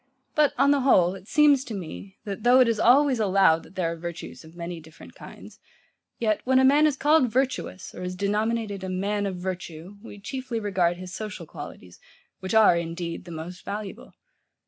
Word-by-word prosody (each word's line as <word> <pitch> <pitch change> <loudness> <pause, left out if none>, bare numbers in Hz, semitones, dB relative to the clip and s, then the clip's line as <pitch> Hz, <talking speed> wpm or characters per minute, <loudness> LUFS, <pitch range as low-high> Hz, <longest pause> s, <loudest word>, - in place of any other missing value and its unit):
But 300 -2 +2
on 275 +2 +4
the 285 - +3
whole, 185 -10 +4
it 195 0 -12
seems 290 -2 +4
to 230 - -6
me, 95 - -8
that 200 0 -5
though 245 +3 +5
it 255 - +6
is 230 -2 0
always 260 +2 +4
allowed, 190 -5 +4
that 185 - -17
there 170 -3 -1
are - - -4
virtues 170 0 -8
of 160 +1 -15
many 170 0 -6
different 160 0 -15
kinds, - - -13 0.6
yet, 215 -3 0
when 260 +1 +2
a 260 - +5
man 290 +3 +5
is 290 -2 -1
called 295 -3 +3
virtuous, 255 -6 -2
or - - -9
is 180 0 -4
denominated 210 +1 -1
a 190 - -4
man 200 +2 -1
of 190 - -4
virtue, 180 0 -6
we 205 -2 -11
chiefly 255 +2 -4
regard 185 -5 0
his 185 0 -9
social 210 -5 -6
qualities, 145 - -11 0.4
which 190 +3 -3
are, 220 -5 +6
indeed, 170 +1 -4
the 175 - -10
most 170 +3 -8
valuable. 205 -1 -7
200 Hz, 195 wpm, -25 LUFS, 175-240 Hz, 0.6 s, it